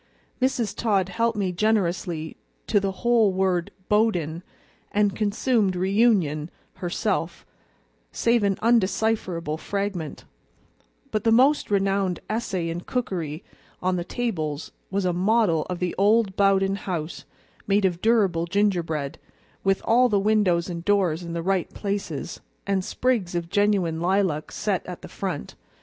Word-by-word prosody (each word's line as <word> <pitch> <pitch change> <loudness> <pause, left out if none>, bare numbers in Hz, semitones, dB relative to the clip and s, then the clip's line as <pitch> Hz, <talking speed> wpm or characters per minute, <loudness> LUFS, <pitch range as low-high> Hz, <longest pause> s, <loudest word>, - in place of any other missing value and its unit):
Mrs. 250 -5 0
Todd 195 -5 +1
helped 230 +2 0
me 195 -3 0
generously 175 -5 0 0.3
to 205 - +3
the 195 0 -1
whole 230 -4 +4
word 185 -2 0 0.2
BOWDEN, 180 -7 +1 0.5
and 205 -2 +2
consumed 215 -1 +1
REUNION 185 -6 +2 0.3
herself, 180 -1 -2 0.7
save 235 0 +2
an 200 -1 +1
undecipherable 195 -7 +1
fragment; 200 -6 -4 0.9
but 215 -1 -1
the 225 - +3
most 265 +6 +4
renowned 195 -2 +1
essay 195 -6 -2
in 170 +1 -4
cookery 175 - -3 0.4
on 185 0 0
the 175 - -2
tables 165 - -3 0.2
was 195 0 -1
a 180 - +1
model 185 -3 +2
of 180 - -2
the 180 0 -2
old 205 -1 +3
Bowden 195 0 +3
house 175 -4 -5 0.4
made 200 0 +3
of 175 -2 0
durable 195 -7 +2
gingerbread, 170 -7 0 0.4
with 195 0 +1
all 250 +2 +4
the 205 -3 +2
windows 195 -5 +2
and 170 -2 -5
doors 185 -5 +2
in 170 -1 -6
the 170 0 -3
right 190 -1 0
places, 195 -8 -4 0.2
and 195 -2 0
sprigs 220 -6 0
of 170 -1 -3
genuine 200 -6 +2
lilac 180 -4 0
set - - -1
at - - -8
the - - -7
front. 65 - -5
195 Hz, 135 wpm, -25 LUFS, 175-210 Hz, 0.9 s, whole